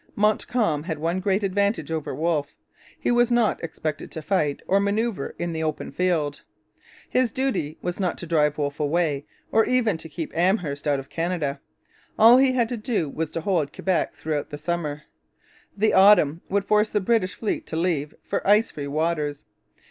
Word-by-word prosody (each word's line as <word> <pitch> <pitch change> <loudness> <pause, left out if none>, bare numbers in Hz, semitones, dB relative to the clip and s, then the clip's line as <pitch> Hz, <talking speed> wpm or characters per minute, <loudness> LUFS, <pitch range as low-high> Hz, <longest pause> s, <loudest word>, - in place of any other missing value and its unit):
Montcalm 210 -5 +1
had 160 -3 -3
one 165 +4 -1
great 195 +2 0
advantage 195 -4 0
over 155 -4 -3
Wolfe. 150 -1 -1 0.4
He - - 0
was 240 0 +3
not 240 -6 +2
expected 155 -2 -4
to 160 - -7
fight 150 -6 0
or 195 - +3
manoeuvre 200 -4 -1
in 170 -1 -3
the 160 - -3
open 155 -1 -3
field. 160 -6 0 0.7
His 255 -2 +1
duty 255 - -2
was 175 +2 -3
not 180 -4 -1
to - - -7
drive 150 -3 +2
Wolfe 145 -1 -2
away, 150 -1 0 0.3
or 225 - +5
even 230 -9 +1
to 160 - -10
keep 160 0 -6
Amherst 170 -5 0
out 145 -1 +2
of 135 - -11
Canada. 165 -5 -2 0.6
All 230 +3 +8
he 265 0 +4
had 240 -3 +2
to 245 - -3
do 210 - -1
was 160 +2 -3
to 165 - -4
hold 160 -5 0
Quebec 185 -2 -1
throughout 150 -2 -3
the 145 - -6
summer. 150 -2 -3 0.7
The 215 +2 +2
autumn 185 -5 +6
would 200 0 0
force 210 0 +3
the 210 - +1
British 200 -1 +1
fleet 220 - -3
to - - -5
leave 160 -4 -1
for - - -2
ice 210 +3 +4
free 145 -1 -6
waters. 150 -1 -1
170 Hz, 180 wpm, -24 LUFS, 150-205 Hz, 0.7 s, All